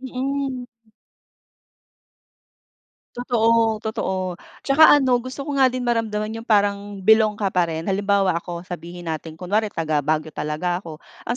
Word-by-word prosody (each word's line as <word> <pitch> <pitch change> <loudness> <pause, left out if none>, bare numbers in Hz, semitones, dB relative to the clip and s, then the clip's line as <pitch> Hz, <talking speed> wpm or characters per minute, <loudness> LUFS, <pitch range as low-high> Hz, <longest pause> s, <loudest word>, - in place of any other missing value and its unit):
Mm. 265 0 -3 2.5
Totoo, 230 -2 +2
totoo. 185 -4 -3 0.2
Tsaka 295 +2 +7
ano, 255 -3 +2
gusto 255 +3 -7
ko 290 - -4
nga 260 - +6
din 255 0 -4
maramdaman 220 -3 -1
yung 225 +1 -8
parang 205 -1 +1
belong 220 0 +5
ka 200 -3 -2
pa 175 -2 +2
rin. 160 0 -4
Halimbawa 195 -3 +1
ako, 175 -1 -7
sabihin 175 0 -8
natin 160 0 -5
kunwari 205 +6 -1
taga-Baguio 155 -2 -1
talaga 175 +5 -2
ako. 165 -5 -9 0.3
Ang 240 - 0
205 Hz, 130 wpm, -22 LUFS, 175-240 Hz, 2.5 s, Tsaka